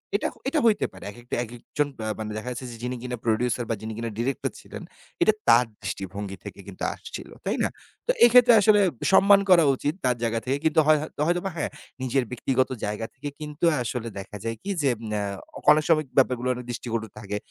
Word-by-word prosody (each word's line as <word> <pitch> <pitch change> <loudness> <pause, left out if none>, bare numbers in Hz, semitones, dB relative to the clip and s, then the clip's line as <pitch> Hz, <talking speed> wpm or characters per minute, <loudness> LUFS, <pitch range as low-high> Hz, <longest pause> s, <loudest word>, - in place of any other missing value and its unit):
এটা - - +1 0.2
এটা 305 +2 +2
হইতে 220 -2 +4
পারে। 95 - -12
একেকটা, 120 +2 -6
একেকজন 120 +5 -3
বা 110 - -3
মানে 110 0 -4
দেখা 125 +3 -5
যাচ্ছে 125 +1 -6
যে - - -8
যিনি 125 +1 -2
কিনা 125 -1 -4
প্রোডিউসার 120 +1 +1
বা 115 - +1
যিনি 110 0 -5
কিনা 115 0 -3
ডিরেক্টর 125 +3 -1
ছিলেন। - - -9 0.4
এটা 215 - +5
তার 120 +1 +7 0.2
দৃষ্টিভঙ্গি 95 0 -5
থেকে - - -8
কিন্তু 95 - -8
আসছিলো, - - -9
তাই - - 0
না? - - +1 0.4
তো - - +5
এই 240 - +9
ক্ষেত্রে 245 -1 +8
আসলে 210 -1 +5 0.3
সম্মান 200 +1 +7
করা 170 -3 +7
উচিত 145 +3 -1
তার 125 -1 +3
জায়গা 115 0 0
থেকে 135 +2 0
কিন্তু 160 0 +4
হয় 155 -1 +6
হয় 155 - -6 0.2
হয়তোবা 175 +2 0
হ্যাঁ, - - -2 0.3
নিজের 130 0 +1
ব্যক্তিগত 130 +1 0 0.2
জায়গা 105 +2 -3
থেকে 145 +2 -6
কিন্তু 150 +2 -3 0.2
আসলে 120 0 -3
দেখা 105 +2 -8
যায় 115 0 -2
কি 200 - -5
যে, 140 - +3 0.3
আ - - -1 0.5
অনেক 155 0 +4
সময় 155 -2 +4
ব্যাপারগুলো 125 -1 +3
অনেক 125 0 -7
দৃষ্টিকটু 115 -2 -3
থাকে, 105 -1 -4
125 Hz, 200 wpm, -25 LUFS, 115-155 Hz, 0.5 s, এই